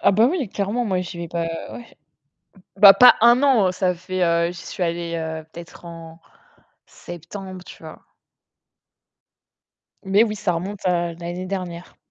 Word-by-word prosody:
Ah - - +3
bah 220 +4 +4
oui, 310 - -2
clairement, 205 +5 -2
moi, 185 -4 -1
j'y 175 -1 -7
vais 170 - -5
pas 170 0 -3
ouais 165 0 -5 1.1
bah 200 0 +9
pas 250 +3 +7
1 240 +3 +5
an, 230 -10 +3
ça 180 -1 -1
fait, 185 +1 -3
heu, 170 0 +1
j'y 175 - -10
suis 185 - -4
allée, 170 0 -3
heu, 160 -1 -5
peut-être 170 +1 -12
en 165 -1 -11 0.6
septembre, 185 +2 -10
tu - - -14
vois? - - -12 2.0
Mais 195 +3 +3
oui, 215 -2 -2
ça 200 -3 -1
remonte 190 +4 -6
à 175 -1 0
l'année 175 +2 -7
dernière. 180 -2 -7
180 Hz, 160 wpm, -21 LUFS, 170-200 Hz, 2.0 s, bah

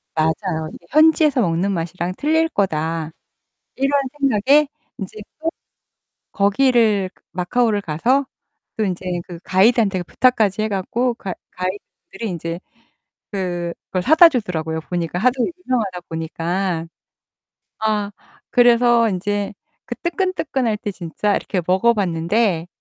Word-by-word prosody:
맞아요. 160 0 -1 0.2
'현지에서 310 -3 +4
먹는 180 +2 +1
맛이랑 175 +1 -3
틀릴 320 +2 +2
거다.' 165 - -1 0.6
이런 275 +1 +2 0.2
생각에 275 +3 +4 0.3
이제 195 +2 -7 1.0
또 - - -60
거기를 210 -2 +3 0.2
마카오를 205 +4 +1
가서 240 - +1 0.5
또 220 - 0
이제 185 -1 -3 0.2
그 175 -2 -8
가이드한테 195 -1 +3
부탁까지 215 -3 +2
해 215 - 0
갖고 230 +5 -1
가 190 -5 -6 0.2
가이드분들이 195 +3 -6
이제 165 +1 -5 0.7
그걸 180 -1 -3
사다 320 - +8
주더라고요, 160 - -2
보니까. 175 0 -2
하도 250 +2 +2 0.2
유명하다 210 -8 -1
보니까. 165 +2 -2 0.9
아. 210 -2 0 0.4
그래서 240 -1 +5
인제 205 +2 -2 0.3
그 - - -5
뜨끈뜨끈할 325 - -1
때 210 -2 -4
진짜 185 +4 -1
이렇게 185 -4 -2
먹어봤는데. 185 -2 +1
200 Hz, 270 characters per minute, -20 LUFS, 175-240 Hz, 1.0 s, 사다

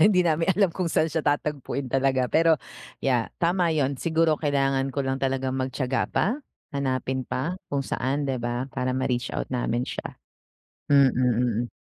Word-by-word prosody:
Hindi 200 -3 +5
namin 165 +3 +2
alam 195 -1 +3
kung 180 -3 -1
saan 160 - +2
siya 160 0 -2
tatagpuin 145 -2 -1
talaga 130 -1 +1
pero, 160 0 +4 0.4
yeah, 125 -4 +1
tama 170 -1 +2
'yun 140 -3 0
siguro 160 +1 +2
kailangan 135 -2 +1
ko 140 - -1
lang 135 -1 -1
talagang 130 0 0
magtiyaga 130 0 -1
pa, - - +1 0.5
hanapin 130 -1 -1
pa 160 +8 -2 0.2
kung 140 - +1
saan, 140 +3 -1
'di 130 - 0
ba, 120 +2 -2
para 130 -1 -2
ma-reach 125 -1 -1
out - - -3
namin 120 -1 -1
siya. - - -6 0.7
Mm, 140 -2 +6
mm. 120 -1 +1
135 Hz, 160 wpm, -25 LUFS, 130-155 Hz, 0.7 s, Mm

